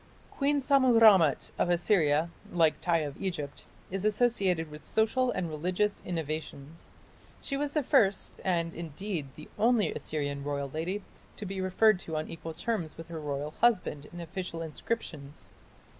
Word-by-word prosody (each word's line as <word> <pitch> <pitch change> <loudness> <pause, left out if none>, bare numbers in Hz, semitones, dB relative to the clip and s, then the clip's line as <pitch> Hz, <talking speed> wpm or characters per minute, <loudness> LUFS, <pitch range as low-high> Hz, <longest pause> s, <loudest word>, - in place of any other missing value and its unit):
Queen 285 +1 +1
Sammu 260 -4 +4
rammat 190 - +6
of - - +2
Assyria, 170 -3 +2 0.2
like 165 -3 +2
Tiy 165 -3 +2
of 145 0 -7
Egypt, 150 -7 -4 0.3
is 195 0 -2
associated 200 -7 +2
with 150 0 -10
social 245 +4 +1
and 180 -7 -1
religious 180 +6 -1
innovations. 155 -2 -5 0.5
She 275 - -3
was 290 +1 -2
the 300 - +1
first, 220 -8 +2
and, 170 -3 0
indeed, 170 0 -4
the 155 - -11
only 230 -1 +3
Assyrian 145 -2 -3
royal 140 -1 -3
lady, 180 +6 -2 0.3
to 210 - -6
be 195 0 -4
referred 190 +2 +4
to 160 -3 -5
on 155 - -3
equal 165 -1 -7
terms 175 -4 -3
with 165 +1 -9
her 165 -1 -5
royal 145 0 -3
husband 180 -11 +2
in 175 - -9
official 170 -1 -5
inscriptions. 155 -4 -5
175 Hz, 155 wpm, -30 LUFS, 155-210 Hz, 0.5 s, rammat